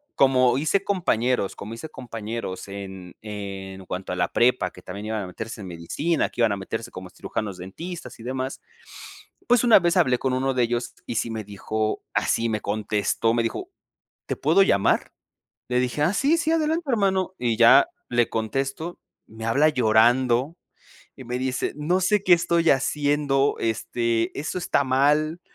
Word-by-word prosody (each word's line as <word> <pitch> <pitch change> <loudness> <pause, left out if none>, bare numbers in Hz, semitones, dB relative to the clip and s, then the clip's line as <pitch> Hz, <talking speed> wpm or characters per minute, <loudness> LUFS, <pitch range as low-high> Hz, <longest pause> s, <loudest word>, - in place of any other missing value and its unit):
como 130 -2 +4
hice 190 +6 +1
compañeros, 125 - 0
como 110 +3 -8
hice 155 +7 -8
compañeros 115 -7 -6
en 95 -2 -8
en 95 -2 -7
cuanto 90 0 -4
a - - -2
la 90 - 0
prepa, 120 -6 +2
que 90 - -14
también 100 +3 -7
iban 110 -2 -2
a - - -6
meterse 110 +4 -7
en 95 - -7
medicina, 90 - -1
que - - -4
iban 115 -2 +4
a - - -3
meterse 110 +4 -5
como 95 0 -9
cirujanos 100 -3 -5
dentistas 125 - -8
y 115 - -10
demás, 130 +1 -4 0.9
pues 245 -1 +4
una 235 -4 +7
vez 175 +1 +1
hablé 125 -8 +3
con 130 -1 -1
1 135 +1 0
de 125 - +3
ellos 120 +1 -2
y 120 - -4
sí 115 - -1
me 110 -1 -4
dijo 110 +2 -3
así, 115 - +1
me 110 -1 -2
contestó, 105 +2 0
me 120 - +2
dijo: 230 - -4 0.6
"¿Te - - -2
puedo 180 +5 +4
llamar?" 100 - +2 0.6
Le 125 0 +1
dije: 125 +4 -1
"Ah, 170 +6 +3
sí, 285 +9 +3
sí, 320 -1 +1
adelante, 320 0 0
hermano" 190 -5 +1
y 120 -2 0
ya 115 - +7 0.2
le 120 -1 +2
contesto. 135 +9 -3 0.3
Me 110 +1 -10
habla 140 +7 +4
llorando 125 +3 +3 0.6
y 130 - -10
me 125 +1 -3
dice: 130 0 -2
"No 165 +5 +1
sé 200 +2 +2
qué 180 - +7
estoy 170 -1 +1
haciendo. 145 0 +1
Este, 115 +1 -1
eso 155 +5 -3
está 140 -4 +1
mal, 150 +5 +2
125 Hz, 175 wpm, -24 LUFS, 110-155 Hz, 0.9 s, una